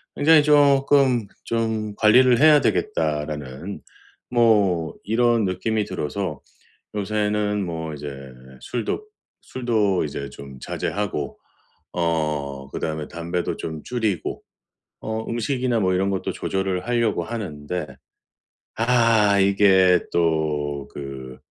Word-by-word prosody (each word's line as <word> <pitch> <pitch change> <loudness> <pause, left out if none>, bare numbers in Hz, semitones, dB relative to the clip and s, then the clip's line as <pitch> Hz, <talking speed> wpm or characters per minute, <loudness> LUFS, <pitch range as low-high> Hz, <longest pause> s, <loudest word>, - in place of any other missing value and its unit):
굉장히 155 +1 +5
쪼끔 140 -4 +4 0.2
'좀 110 -2 -2
관리를 120 +3 +5
해야 150 0 +7
되겠다.'라는 75 - -2 0.5
뭐 105 -9 +3
이런 115 0 +2
느낌이 105 +3 -1
들어서 75 -7 -4 0.5
요새는 105 0 0
뭐 80 -2 -4
이제 75 0 -7 0.5
술도 125 - -3 0.4
술도 110 -7 0
이제 70 -2 -5
좀 70 -1 -11
자제하고 95 -7 -3 0.5
어 75 -5 -2
그다음에 80 -1 -4
담배도 85 +1 -3
좀 80 -2 -6
줄이고 110 -7 -2 0.6
어 110 0 -4
음식이나 120 0 -1
뭐 95 -2 +2
이런 95 +2 +1
것도 95 -1 -2
조절을 95 -1 -2
하려고 115 -3 +1
하는데 90 -7 -5 0.9
아 115 -4 +3
이게 95 -2 +5
또 75 -4 0
그 65 -2 -8
100 Hz, 220 characters per minute, -23 LUFS, 80-115 Hz, 0.9 s, 해야